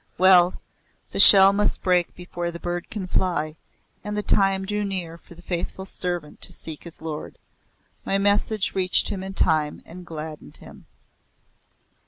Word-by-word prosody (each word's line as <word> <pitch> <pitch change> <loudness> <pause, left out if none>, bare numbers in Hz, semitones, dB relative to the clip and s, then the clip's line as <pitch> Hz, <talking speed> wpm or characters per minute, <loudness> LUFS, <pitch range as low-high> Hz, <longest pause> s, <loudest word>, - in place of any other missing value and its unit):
Well 180 -1 +5 0.5
the - - -4
shell 195 -1 +9
must 205 +1 0
break 180 -2 +1
before 175 -1 -5
the 170 0 -8
bird 175 0 -4
can 205 -4 -4
fly, 175 -4 -1 0.5
and 210 0 -4
the 210 - -2
time 195 -1 +2
drew 210 +1 -2
near 185 -5 -4
for 170 0 -16
the 175 - -16
faithful 175 +2 -4
servant 175 -5 -5
to - - -7
seek 160 -1 -10
his 170 - -12
lord. 155 -2 -6 0.7
My 195 - 0
message 205 +1 +1
reached 185 -2 +1
him 195 - -4
in 190 0 -7
time 155 -4 +1
and 180 +2 -11
gladdened 155 -2 -8
him. - - -15
180 Hz, 160 wpm, -23 LUFS, 170-195 Hz, 0.7 s, shell